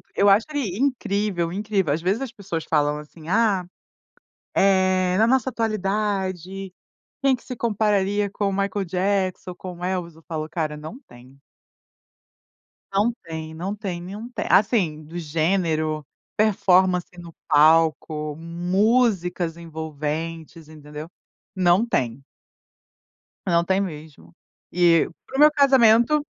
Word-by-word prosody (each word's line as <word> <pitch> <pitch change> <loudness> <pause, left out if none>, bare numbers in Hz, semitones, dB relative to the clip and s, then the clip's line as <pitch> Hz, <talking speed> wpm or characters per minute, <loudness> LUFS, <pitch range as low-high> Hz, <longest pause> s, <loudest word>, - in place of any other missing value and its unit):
Eu 200 0 +4
acho 205 +3 +5
ele 225 -11 -2
incrível, 205 -9 0
incrível, 195 -6 0
às 160 - -2
vezes 195 +8 0
as 260 -4 -4
pessoas 190 -7 -5
falam 150 -1 +1
assim: 155 +1 -13
"Ah, 205 -4 +2 0.9
eh, 185 -1 +3
na 220 - +4
nossa 260 0 +2
atualidade, 195 -4 -2 0.5
quem 270 -1 +4
que 235 - -17
se 250 - -6
compararia 205 -2 +1
com 200 +1 -3
o - - -3
Michael 195 0 -1
Jackson, 185 0 -1
com 180 -1 -8
o - - -8
Elvis?" 180 -3 -3
Eu 165 - -18
falo: 155 -1 -4
"Cara, 155 -2 -3
não 155 - -9
tem." 125 +3 -17 1.5
Não 205 +4 +2
tem, 160 -1 -7
não 185 +6 -4
tem 190 -5 -5
nenhum, 205 +7 -8 0.2
assim, 185 -8 +2
do 165 +3 -9
gênero, 155 -1 0 0.3
performance 185 -4 +3
no 170 -1 -10 0.2
palco, 155 0 +3
músicas 180 +1 0
envolventes, 160 0 -5
entendeu? 150 0 -9 0.5
Não 185 +3 +3
tem. 130 - -2 1.2
Não 170 -1 +3
tem 190 +2 +1
mesmo. 150 - -8 0.4
E 170 -2 +4 0.2
para 270 - -6
o - - -1
meu 300 +1 +8
casamento, 265 -1 +5
185 Hz, 125 wpm, -23 LUFS, 160-205 Hz, 1.5 s, meu